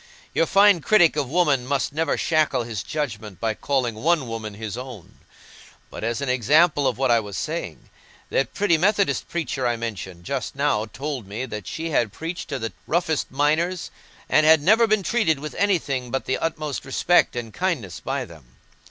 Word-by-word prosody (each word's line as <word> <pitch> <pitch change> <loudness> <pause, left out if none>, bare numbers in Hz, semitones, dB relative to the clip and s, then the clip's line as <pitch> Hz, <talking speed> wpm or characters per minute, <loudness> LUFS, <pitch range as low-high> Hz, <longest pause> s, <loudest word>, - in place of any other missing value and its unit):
Your 165 - +2
fine 200 -3 +5
critic 175 -4 +4
of 145 -4 -1
woman 150 -5 +2
must 140 0 -1
never 160 +2 0
shackle 155 -6 +1
his 115 -4 -4
judgment 110 - -5
by 110 +1 0
calling 130 0 -1
one 150 +4 +1
woman 110 -2 -5
his 110 -1 -5
own. 125 -7 -9 0.7
But, - - -7
as 115 +3 -1
an 140 - -2
example 145 +4 +3
of 125 -4 -1
what 130 -1 +2
I 115 - +5
was 100 -3 -6
saying, - - -5 0.4
that 135 - 0
pretty 195 -6 +2
Methodist 195 - +1
preacher 150 -7 -2
I 120 - +1
mentioned 100 -6 -6
just 135 +9 -4
now 140 -7 +1
told 135 -1 -5
me 105 +6 -4
that 105 -7 -7
she 165 - -4
had 120 -7 +1
preached 165 - -6
to 140 - -2
the 115 -5 -4
roughest 160 -2 0
miners 155 +6 0 0.4
and 155 - +4
had 155 -1 +6
never 220 +6 +5
been 215 -2 +2
treated 185 -5 +1
with 150 +1 -6
anything 150 -10 0
but 135 +2 -2
the 130 - -1
utmost 155 -3 -3
respect 160 +5 +2
and 115 -2 -5
kindness 150 - -2
by 135 0 -3
them. 80 - -16
140 Hz, 185 wpm, -23 LUFS, 115-165 Hz, 0.7 s, had